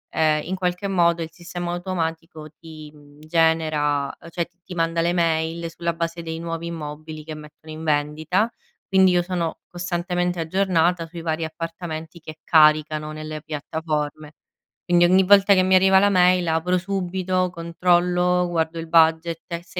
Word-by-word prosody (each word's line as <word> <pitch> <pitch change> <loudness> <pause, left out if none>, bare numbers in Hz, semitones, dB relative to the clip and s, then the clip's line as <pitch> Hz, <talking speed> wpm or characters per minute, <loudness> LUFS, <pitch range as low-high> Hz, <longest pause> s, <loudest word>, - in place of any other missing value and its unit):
ehm, 155 -1 +2
in 180 - -4
qualche 180 +1 -2
modo 170 -3 +2
il 160 - -7
sistema 175 0 -6
automatico 165 -3 -4
ti, 155 -2 -11
uhm, 145 0 -19
genera 155 -3 +1
cioè 170 0 -2 0.2
ti 180 - -9
manda 165 0 0
le 170 +1 +1
mail 165 -1 0
sulla 170 0 -3
base 170 0 -4
dei 160 -1 -5
nuovi 165 0 -5
immobili 155 -1 -7
che 155 +1 -7
mettono 155 +1 -12
in 155 +1 -8
vendita, 155 +6 0 0.4
quindi 190 -1 +5
io 175 0 +2
sono 175 -2 -3
costantemente 175 0 -2
aggiornata 175 0 +1
sui 170 +1 -9
vari 160 0 -2
appartamenti 165 0 -7
che 155 -1 -10
caricano 155 -1 +3
nelle 155 0 -7
piattaforme. 150 0 -4 0.5
Quindi 175 0 +4
ogni 185 +2 +5
volta 200 +1 +6
che 185 - +4
mi 185 0 +2
arriva 190 +1 +5
la 200 +1 +4
mail 180 -1 +4
apro 165 +3 +1
subito, 185 -1 -1
controllo, 180 +1 +1
guardo 165 -1 -1
il 165 - -6
budget 165 0 +3
e, 170 -2 -5
se 180 +1 -7
165 Hz, 160 wpm, -22 LUFS, 160-180 Hz, 0.5 s, volta